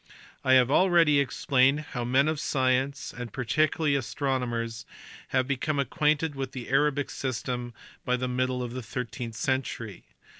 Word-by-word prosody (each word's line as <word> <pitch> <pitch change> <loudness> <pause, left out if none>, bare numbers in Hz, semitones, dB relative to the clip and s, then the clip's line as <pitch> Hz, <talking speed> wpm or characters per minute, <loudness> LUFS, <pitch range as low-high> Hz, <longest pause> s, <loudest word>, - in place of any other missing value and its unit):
I 130 - +4
have 130 0 +5
already 170 -4 +5
explained 135 0 +2
how 125 - -3
men 130 +4 +3
of 155 -1 -1
science, 130 -1 0
and 120 -1 -6
particularly 150 +4 +1
astronomers, 120 -2 -2 0.4
had 130 -1 +1
become 140 +2 -1
acquainted 150 +2 +1
with 135 -2 -5
the 125 -3 -7
Arabic 145 +1 +1
system 120 -2 -4 0.3
by 125 0 +1
the 125 0 -2
middle 125 0 -1
of 120 -1 -5
the 130 - -4
thirteenth 120 0 -5
century. 120 -6 -3
130 Hz, 145 wpm, -27 LUFS, 125-140 Hz, 0.4 s, have